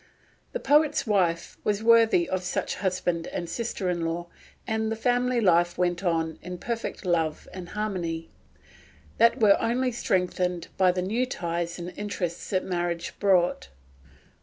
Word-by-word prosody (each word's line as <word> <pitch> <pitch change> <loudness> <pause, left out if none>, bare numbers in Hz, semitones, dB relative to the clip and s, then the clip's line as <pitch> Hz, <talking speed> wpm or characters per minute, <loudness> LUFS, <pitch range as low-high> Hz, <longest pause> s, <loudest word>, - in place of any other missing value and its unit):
The - - -2
poet's 295 - +3
wife 180 -6 0
was 210 +1 0
worthy 225 -6 +5
of 185 -1 -1
such 185 0 -2
a - - -7
husband 180 -3 -1
and 170 - -4
sister 215 0 -3
in 175 -1 0
law, 170 +1 -3 0.4
and 220 0 -1
the - - 0
family 245 +1 +1
life 175 -4 +3
went 175 0 0
on 165 -3 0
in 180 +1 -6
perfect 230 0 -4
love 165 -3 0
and 180 -2 -8
harmony, 180 -6 -3 0.9
that 230 +3 +5
were 210 -3 +5
only 250 +2 +1
strengthened 180 -5 -1
by 185 -1 +4
the 180 0 -2
new 230 +7 0
ties 170 -5 -3
and 175 0 -6
interests 185 -5 -4
that 185 -2 0
marriage 175 -2 -2
brought. 180 - +2
185 Hz, 155 wpm, -26 LUFS, 175-220 Hz, 0.9 s, worthy